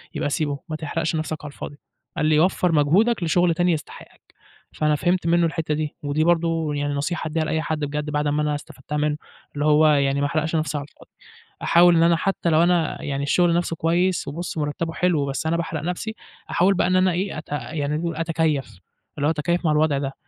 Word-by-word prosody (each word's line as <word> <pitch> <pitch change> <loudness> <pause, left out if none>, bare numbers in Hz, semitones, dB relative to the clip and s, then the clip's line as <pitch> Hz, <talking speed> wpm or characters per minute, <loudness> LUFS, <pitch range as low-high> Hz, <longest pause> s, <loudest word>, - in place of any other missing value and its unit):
يبقى - - -1
سيبه، 145 -2 -1
ما 155 - -3
تحرقش 160 +1 -2
نفْسك 155 0 -2
على 145 - -6
الفاضي" 145 - -8 0.4
قال - - +1
لي: 155 0 +4
"وفّر 180 0 +2
مجهودك 175 +9 +3
لشغل 175 +1 +3
تاني 175 +1 +2
يستحقك" 155 -2 -7 0.5
فأنا 150 -1 +1
فهمت 175 +2 0
منه 170 0 +3
الحتّة 160 -1 -1
دي، 150 0 -3
ودي 145 +2 0
برضه 165 -2 +1
يعني 145 0 -1
نصيحة 160 +4 -2
أديها 160 +1 -1
لأي 160 0 -1
حد 160 -1 -2
بجد 150 0 -3
بعد 150 0 0
ما 145 +1 +1
أنا 150 -1 0
استفدتها 145 -1 -7
منه، 150 0 0 0.4
اللي 145 0 -2
هو 155 +1 +5
يعني 140 -2 +2
ما - - +2
أحرقش 160 +1 -1
نفْسي 155 -2 -1
على 145 - -4
الفاضي، - - -20 0.5
أحاول 175 0 +6
إن 165 - +4
أنا 170 0 +5
حتّى 185 0 -1
لو 160 +1 +4
أنا 175 -2 +1
يعني 140 -1 -3
الشغل 170 +4 +3
نفْسه 170 -1 0
كويس 175 +3 +1
وبُص 165 +4 -5
مرتّبه 155 +2 -2
حلو 170 -6 +1
بس 140 +1 -3
أنا 170 - +1
باحرق 165 -2 -3
نفْسي، 180 +6 -3 0.4
أحاول 185 +3 +3
بقى 180 - +1
إن 185 - +2
أنا 185 0 +4
إيه 185 +1 -2
أت 155 - -9
يعني 145 +2 -2 0.2
أتكيّف، 160 - -1 0.4
اللي 145 0 +1
هو - - +3
أتكيّف 170 +3 -1
مع 155 - +3
الوضع 150 -2 +2
ده، 135 -1 -3
155 Hz, 210 wpm, -23 LUFS, 150-170 Hz, 0.5 s, أحاول